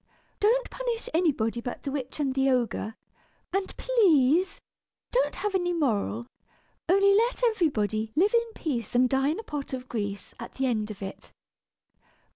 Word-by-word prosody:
Don't 475 +4 +3
punish 480 -2 -3
anybody 260 -9 +1
but 245 - -6
the 275 - -3
witch 270 0 -4
and 275 -3 0
the 270 0 +2
ogre; 235 -3 0 0.6
and 390 0 -2
please 370 - +3 0.5
don't - - +1
have 415 -1 -2
any 355 -2 +1
moral, 235 -7 0 0.6
only 395 +2 +5
let 470 +4 +2
everybody 220 - +1
'live 390 +8 +3
in 465 -1 +2
peace 245 - -3
and 250 +1 +5
die 270 +2 +1
in 315 - -1
a - - -6
pot 290 -8 -5
of 255 -1 -5
grease,' 205 -4 -4
at 235 - -8
the 265 - 0
end 220 -4 0
of 205 -2 -7
it." 195 - -8
280 Hz, 160 wpm, -27 LUFS, 235-395 Hz, 0.6 s, only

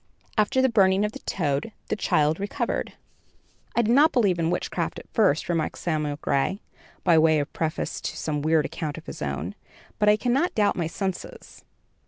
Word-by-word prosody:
After 260 +5 +2
the - - +6
burning 195 -4 +3
of 210 - -2
the - - -9
toad, 150 +3 -2 0.2
the - - +1
child 155 -5 +1
recovered." 200 +1 -2 0.8
"I 235 - +3
did 230 +2 +2
not 300 +5 +6
believe 200 -8 +2
in 165 0 +1
witchcraft 175 - -2
at - - -10
first," 195 - +2
remarked 165 -3 -1
Samuel 150 -3 -1
Gray, 165 +9 0 0.4
by 165 -2 +5
way 160 0 +4
of 145 0 -2
preface 160 -1 -2
to - - -4
some 150 -2 -2
weird 155 0 +2
account 150 -1 -4
of 160 - -10
his - - -8
own; - - -3 0.5
"but 210 -1 +4
I 210 - +5
cannot 260 +10 +1
doubt 205 -2 +2
my 170 -3 -1
senses. 190 +2 -6
180 Hz, 185 wpm, -25 LUFS, 155-210 Hz, 0.8 s, the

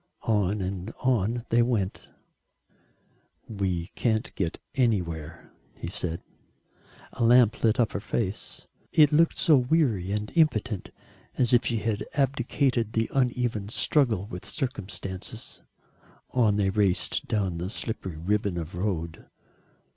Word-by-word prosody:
On 105 -2 +1
and 95 +2 -4
on 120 -1 +1
they 120 +1 +4
went. 115 -6 -1 1.4
"We 95 -5 -2
can't 110 -2 0
get 85 -3 -2 0.2
anywhere," 85 - -1 0.3
he 85 - -5
said. 90 -2 -3 0.9
A 120 - -2
lamp 120 -1 +5
lit 110 0 +3
up 115 -4 +3
her - - -3
face. 100 -1 -3 0.3
It 150 -2 +6
looked 165 +2 +3
so 160 -5 +5
weary 125 - +1
and 105 0 -2
impotent 120 - +1 0.5
as 125 -1 +3
if 120 - +4
she 115 - 0
had 110 -1 -1
abdicated 130 -4 +1
the 115 0 0
uneven 120 -5 0
struggle 115 - +2
with 90 -3 -8
circumstances. 95 - -5 0.7
On 115 -5 +3
they 100 -2 +1
raced, 100 -3 +1
down 95 -6 -1
the 90 +2 -3
slippery 100 -6 -4
ribbon 100 +2 0
of 80 0 -5
road. 90 -3 -3
105 Hz, 125 wpm, -27 LUFS, 95-120 Hz, 1.4 s, It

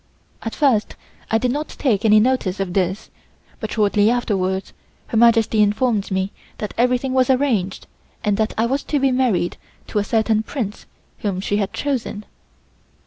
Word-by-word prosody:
At 225 - -5
first 260 -8 +2 0.3
I 225 - +3
did 245 +2 0
not 295 +3 -2
take 225 -7 0
any 215 -1 +6
notice 215 -5 +1
of 190 -2 -2
this, 190 +1 -1 0.5
but - - -5
shortly 210 -1 +3
afterwards 195 -6 -1 0.4
Her 225 - -1
Majesty 225 -1 +4
informed 210 0 +1
me 190 0 -1 0.3
that 210 - -5
everything 250 +2 +1
was 260 -1 +3
arranged 250 -8 +1 0.4
and 205 -1 +2
that 220 -1 0
I 225 - +2
was 270 +4 -1
to 295 - 0
be 270 -1 +2
married 245 -9 +1 0.3
to 210 - 0
a - - +1
certain 220 0 +1
Prince 220 -2 -5 0.3
whom 195 -3 -2
she 200 +1 -1
had 200 -1 -1
chosen. 250 -7 -3
220 Hz, 165 wpm, -21 LUFS, 205-250 Hz, 0.5 s, any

